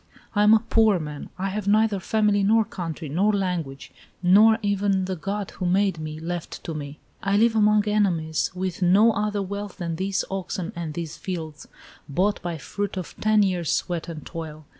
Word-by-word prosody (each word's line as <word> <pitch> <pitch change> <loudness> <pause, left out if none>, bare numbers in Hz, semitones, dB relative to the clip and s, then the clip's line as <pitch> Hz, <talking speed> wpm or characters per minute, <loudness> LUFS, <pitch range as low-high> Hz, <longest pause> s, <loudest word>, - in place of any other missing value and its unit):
I 205 - +3
am 210 +1 +7
a 225 +1 0
poor 220 -3 +4
man. 150 -3 -6
I 195 +1 -2
have 200 +1 -4
neither 215 -1 +3
family, 210 +1 +2
nor 220 +2 +4
country, 165 -5 -6
nor 185 +9 +2
language, 170 -9 -3 0.3
nor 215 +5 +6
even 200 -2 +1
the 185 0 -3
God 200 +4 -4
who 180 - -3
made 190 -1 +2
me 155 0 -6
left 170 +1 -5
to 165 - -4
me. 145 -1 -6 0.2
I 195 +1 +1
live 225 +1 +3
among 210 -1 +4
enemies, 175 -7 +1
with 185 0 -3
no 195 +6 +5
other 210 -1 -1
wealth 200 0 -6
than 170 -3 -3
these 190 +1 -1
oxen 190 0 -4
and 165 -3 -5
these 165 -2 -5
fields, 160 -5 -6 0.4
bought 190 +8 +1
by 175 -1 -3
the - - -9
fruit 205 -1 -4
of 185 - -6
ten 215 -1 +4
years' 180 -5 0
sweat 175 -1 -2
and 155 -3 -7
toil. 155 -2 -7
190 Hz, 190 wpm, -24 LUFS, 165-205 Hz, 0.4 s, am